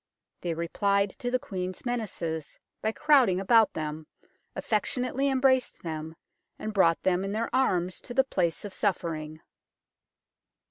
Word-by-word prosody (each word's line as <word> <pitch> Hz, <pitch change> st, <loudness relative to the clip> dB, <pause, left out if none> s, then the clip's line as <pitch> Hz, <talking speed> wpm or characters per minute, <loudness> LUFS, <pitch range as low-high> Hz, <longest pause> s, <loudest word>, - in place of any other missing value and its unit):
They 170 Hz, -2 st, -2 dB
replied 200 Hz, +4 st, +1 dB
to 245 Hz, -, -2 dB
the 255 Hz, -, +2 dB
Queen's 185 Hz, -5 st, -5 dB
menaces 180 Hz, -10 st, -3 dB, 0.2 s
by 220 Hz, -, +1 dB
crowding 255 Hz, -9 st, +4 dB
about 220 Hz, +2 st, +5 dB
them, 155 Hz, 0 st, -5 dB, 0.5 s
affectionately 250 Hz, +5 st, 0 dB
em 265 Hz, -1 st, +1 dB
braced 260 Hz, -1 st, +2 dB
them, 160 Hz, -1 st, -5 dB, 0.4 s
and 215 Hz, -, -5 dB
brought 170 Hz, -5 st, +3 dB
them 185 Hz, 0 st, +2 dB
in 195 Hz, +1 st, -3 dB
their 225 Hz, +3 st, -2 dB
arms 180 Hz, -9 st, +1 dB
to 245 Hz, -, -8 dB
the 265 Hz, -, +5 dB
place 180 Hz, -8 st, -1 dB
of 200 Hz, -, -7 dB
suffering. 160 Hz, -6 st, -2 dB
195 Hz, 140 wpm, -28 LUFS, 170-245 Hz, 0.5 s, about